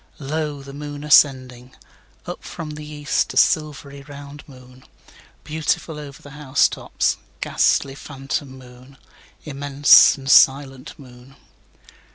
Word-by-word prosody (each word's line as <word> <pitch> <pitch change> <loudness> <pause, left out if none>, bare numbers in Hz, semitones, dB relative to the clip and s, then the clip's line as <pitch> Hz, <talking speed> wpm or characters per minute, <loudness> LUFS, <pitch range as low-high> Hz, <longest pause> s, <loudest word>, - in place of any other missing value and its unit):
2Lo! 150 0 -4
the 140 0 -11
moon 145 0 -8
ascending! 130 -4 +2 0.5
Up - - -8
from 155 -2 -8
the 150 0 -9
east, 150 -1 -2
the - - -7
silvery 145 -2 0
round 145 +1 -12
moon; 130 -1 -17 0.6
Beautiful 155 +1 -3
over 145 -2 -11
the 145 - -13
house 140 -2 +1
tops, - - -2 0.2
ghastly 135 - 0
phantom 135 0 -6
moon; 130 +1 -16 0.5
Immense 145 0 +4
and 135 -1 -11
silent 135 -1 +3
moon. 125 -1 -16
140 Hz, 120 wpm, -20 LUFS, 135-145 Hz, 0.6 s, Immense